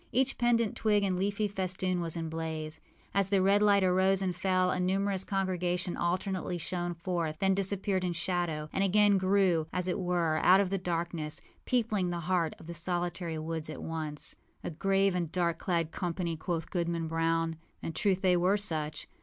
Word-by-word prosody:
Each 265 +2 +2
pendent 235 -2 +2
twig 210 -2 +2
and 190 -2 +1
leafy 200 +3 0
festoon 185 -2 -2
was 165 -1 -2
in 165 -1 -3
a - - -4
blaze. 160 -1 -4 0.3
As 195 0 +1
the 200 -1 +3
red 200 +2 +4
light 200 -2 +5
arose 190 +1 +3
and 180 -2 -1
fell, 185 0 +2
a - - -1
numerous 190 +1 +1
congregation 180 -3 -1
alternately 180 0 -1
shone 175 +1 -2
forth, 170 -2 -2
then 195 +3 +2
disappeared 195 0 0
in 180 -1 0
shadow, 170 -3 -1
and 195 - +1
again 200 0 +4
grew, 185 -4 +2
as 180 0 -2
it 180 - -1
were, 175 -3 +1
out 185 +4 +6
of 195 -2 +1
the 195 - 0
darkness, 170 -3 -3 0.3
peopling 215 -7 +1
the 175 -1 -3
heart 170 -2 0
of - - -13
the 170 - -6
solitary 175 -1 -2
woods 160 0 -4
at 155 - -6
once. 155 -2 -4 0.3
âA 165 - -4
grave 195 0 +3
and 175 -3 -2
dark 170 -2 0
clad 165 -3 0
company,â 170 -2 -3
quoth 170 -2 -3
Goodman 170 -2 -1
Brown. 165 0 0 0.3
In 165 - -3
truth 190 +1 +1
they 180 -1 +4
were 180 +4 +3
such. 160 -7 -2
180 Hz, 185 wpm, -30 LUFS, 165-195 Hz, 0.3 s, out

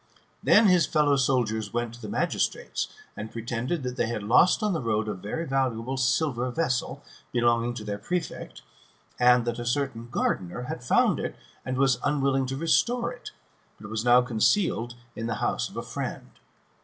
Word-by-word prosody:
Then 220 - +6
his 180 -5 +5
fellow 150 -2 +3
servants 115 -6 0
went 120 -1 -2
to 120 - -12
the 105 - -6
magistrates, - - -1 0.3
and 110 +1 -6
pretended 120 +7 -3
that 125 0 -4
they - - +1
had 115 -3 -3
lost 150 - +4
on 210 -2 +1
the 160 - -1
road 110 -2 0
a 105 - -1
very 105 - -4
valuable 130 -3 -1
silver 125 0 +1
vessel, 130 -2 -1 0.3
belonging 120 0 +2
to 110 - -6
their 105 -1 -4
prefect, 180 - -4 0.6
and 125 -1 +5
that 120 0 -2
a - - -3
certain 120 -2 -2
gardener 95 -1 -1
had 125 -1 -6
found 120 - +3
it, - - -4 0.3
and 130 0 -3
was 135 -2 +3
unwilling 135 -2 +1
to 135 +1 -3
restore 235 - +1
it, 245 - -10 0.5
but 105 0 -9
was 110 0 -2
now 125 +1 +6
concealed 120 - +1 0.2
in 115 - -4
the 115 - -1
house - - -1
of - - -12
a - - -3
friend. - - -5
125 Hz, 180 wpm, -27 LUFS, 115-140 Hz, 0.6 s, Then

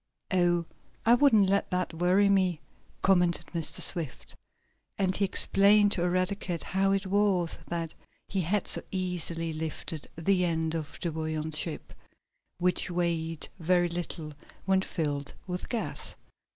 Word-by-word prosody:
"Oh, 175 -2 +2 0.4
I 230 - +6
wouldn't 240 -6 +5
let 200 +1 +1
that 180 -2 -2
worry 180 +4 +3
me," 185 -4 +2 0.4
commented 180 -3 +3
Mr. 165 -2 0
Swift, 165 -8 +1 0.6
and 190 -2 +1
he 200 - 0
explained 200 +2 +4
to 180 - 0
Eradicate 185 0 -1
how 195 +1 +1
it 195 -1 0
was 190 -3 +1
that 165 -2 -4 0.3
he 190 - -1
had 190 +5 0
so - - +3
easily 175 -3 -2
lifted 155 0 -5
the 180 +2 +2
end 160 -2 0
of 155 -3 -5
the 170 - -1
buoyant 155 0 -3
ship, 155 0 -2 0.6
which 180 +1 +1
weighed 165 -2 -1
very 175 +1 +2
little 165 -3 -3 0.3
when 190 0 +3
filled 145 -6 -3
with 180 0 -5
gas. 235 -3 -3
175 Hz, 140 wpm, -28 LUFS, 165-195 Hz, 0.6 s, I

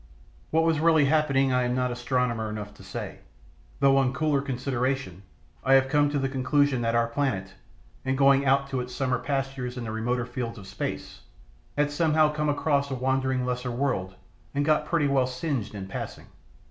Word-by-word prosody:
What 160 +1 +2
was 165 -2 +2
really 160 -2 +4
happening 140 -3 +2
I 125 - +3
am 125 0 0
not 125 -1 0
astronomer 120 -2 -1
enough 105 -1 -6
to 95 - -15
say, 95 - -6 0.6
though 135 0 +5
on 135 -1 +2
cooler 145 -1 +1
consideration 130 -6 -2 0.4
I 135 +1 +5
have 135 0 +4
come 145 +1 +3
to 145 - -1
the 135 -1 0
conclusion 135 0 +1
that 115 0 0
our 115 0 +3
planet, 115 -7 -2 0.5
in 130 0 0
going 140 0 +5
out 140 0 +2
to 130 - -1
its 125 0 -7
summer 130 -3 0
pastures 135 -4 -3
in 125 - -4
the 110 - -4
remoter 120 +2 -1
fields 120 -2 -5
of 100 - -10
space, 95 - -5 0.6
had 145 0 +2
somehow 155 0 +3
come 150 0 -1
across 145 -1 +1
a 135 - -2
wandering 130 0 0
lesser 125 0 -2
world 120 -7 -2 0.4
and 145 0 +1
got 155 0 +2
pretty 165 -4 +1
well 135 -2 +2
singed 125 -4 -3
in 95 -2 -5
passing. 95 - -6
130 Hz, 185 wpm, -26 LUFS, 125-145 Hz, 0.6 s, though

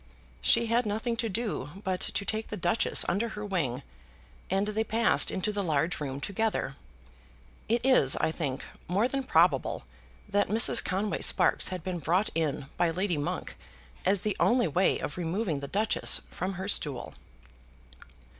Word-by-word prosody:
She 235 - +4
had 230 0 +1
nothing 220 +3 -1
to 230 -1 -1
do 210 - -3
but 185 -2 -1
to 200 - 0
take 220 +1 -2
the 210 - -5
Duchess 175 +4 +2
under 220 +6 0
her 210 -1 -6
wing, 145 -10 -2 0.7
and 195 +2 0
they 215 +1 0
passed 225 -1 +2
into 195 +3 -1
the 205 -1 -2
large 160 -1 0
room 140 -2 -4
together. 200 -5 -2 0.9
It 235 +2 +1
is, 255 - +5
I - - 0
think, 145 -5 -3 0.2
more 200 +7 +2
than 275 +1 -2
probable - - +2 0.4
that 205 0 +1
Mrs. 220 +2 +4
Conway 195 +3 -1
Sparkes - - +3
had 185 -3 -5
been 180 -1 -3
brought 180 +7 +1
in 155 -4 -1
by 175 - +2
Lady 180 0 -1
Monk 145 - -4 0.5
as 190 0 +2
the 210 -2 0
only 240 -4 +3
way 180 +5 +2
of 145 - -5
removing 175 -2 -1
the 140 - -6
Duchess 215 +7 +1
from 185 +2 -3
her 190 +1 -5
stool. 145 -10 +1
195 Hz, 165 wpm, -29 LUFS, 165-220 Hz, 0.9 s, is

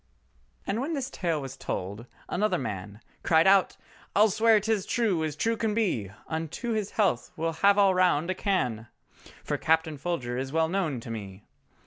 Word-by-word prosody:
And 220 +4 -1
when 305 +5 -2
this 275 -1 -3
tale 170 -5 -1
was 135 -2 -7
told, 100 +6 -5 0.2
another 210 +4 0
man 105 -3 -6 0.2
Cried 160 0 +4
out, 195 0 +4 0.4
"I'll 210 +1 +5
swear 220 +1 +4
'tis 210 -2 -1
true 205 -9 +1
as 155 -2 -2
true 230 +8 0
can 220 -2 -1
be, 170 - 0 0.2
Unto 165 - -4
his 215 -2 -1
health 190 - +1
we'll 165 +1 -1
have 200 0 +5
all 200 -2 +5
round 180 -2 +2
a - - +1
can! 125 - -1 0.6
For - - -2
Captain 160 -2 +1
Folger 130 -7 -2
is 135 0 -4
well 160 +1 +1
known 165 -9 -1
to 115 - -8
me. 100 -3 -7
170 Hz, 175 wpm, -27 LUFS, 130-205 Hz, 0.6 s, I'll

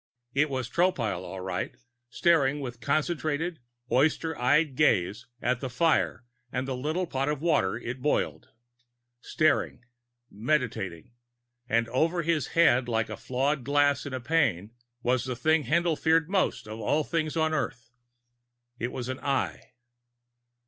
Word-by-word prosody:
It 150 +2 +2
was 130 -3 -2
Tropile, 125 - +1
all 95 0 -7
right, 90 -1 -4 0.3
staring 145 -2 +3
with 125 -3 -6
concentrated, 155 +4 -1 0.3
oyster 155 +4 +2
eyed 145 +3 +3
gaze 110 - +2 0.2
at 125 0 +1
the 130 - -4
fire 130 -1 +1 0.3
and 130 +1 -2
the 130 - -2
little 155 +8 -1
pot 135 -3 -1
of 150 -2 -1
water 150 - +1
it 120 +1 -6
boiled. 150 - -1 0.7
Staring. 155 -5 +1 0.5
Meditating. 110 - -2 0.6
And 115 +1 +2
over 165 +7 +1
his 160 -3 0
head, 130 -7 +5
like 115 -1 -1
flawed 135 +2 -1
glass 145 +1 +2
in 140 - -6
a - - -3
pane, 115 - +1 0.3
was 125 +1 +1
the 130 -1 -3
thing 155 +4 +2
Haendl 165 +4 +1
feared 160 -1 +3
most 190 - 0
of 110 +1 -7
all 145 +8 +1
things 160 -1 -2
on 160 0 +2
Earth. 120 -5 -3 0.9
It 120 +1 -2
was 125 -1 -5
an 130 0 -4
Eye. 140 -2 -1
135 Hz, 140 wpm, -28 LUFS, 120-155 Hz, 0.9 s, head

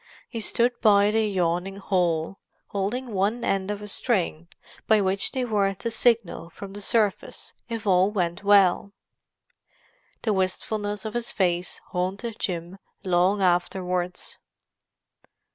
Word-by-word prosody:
He 230 - -5
stood 235 +3 +2
by 205 -2 +5
the 220 0 +2
yawning 180 0 -1
hole, 180 -3 0 0.3
holding 220 +5 -3
one 205 +5 0
end 195 0 0
of 210 0 -4
a - - -7
string 180 -7 -1 0.4
by 220 -1 +5
which 195 0 +2
they 260 -2 -1
were 200 -4 +1
to 230 +5 -4
signal 220 -8 +1
from 195 +3 -10
the 205 - -7
surface, 210 -1 -1 0.2
if 230 -2 -4
all 185 0 +4
went 180 -3 -2
well. 200 -1 +4 1.3
The 220 - +1
wistfulness 205 +3 -2
of 220 - -4
his 240 -1 -1
face 180 -2 -1
haunted 195 +5 -3
Jim 175 0 -4 0.2
long 185 +2 +2
afterwards. 180 0 -1
195 Hz, 130 wpm, -25 LUFS, 180-215 Hz, 1.3 s, by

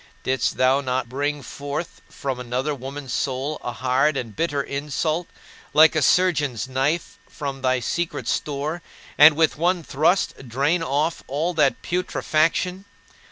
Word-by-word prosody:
Didst 130 0 0
thou 130 +2 +3
not 130 -3 -2
bring 145 +2 -2
forth 145 +6 -6
from 135 -2 -4
another 125 +4 -2
woman's 135 -1 -6
soul 140 +3 -2
a 120 - -3
hard 130 +4 +1
and 115 -5 -5
bitter 145 -2 0
insult, 150 +5 -2 0.5
like 160 +2 +7
a 155 - +2
surgeon's 145 -7 +2
knife 135 +6 -1
from 140 -3 -5
thy 130 -1 +1
secret 170 +8 -2
store, 150 +3 -2 0.3
and 150 +1 +8
with 160 0 +2
one 175 +2 +1
thrust 155 -3 0
drain 140 +8 +1
off 155 +2 0
all 155 +6 -1
that 150 -4 +2
putrefaction? 180 +1 0
145 Hz, 140 wpm, -23 LUFS, 130-160 Hz, 0.5 s, and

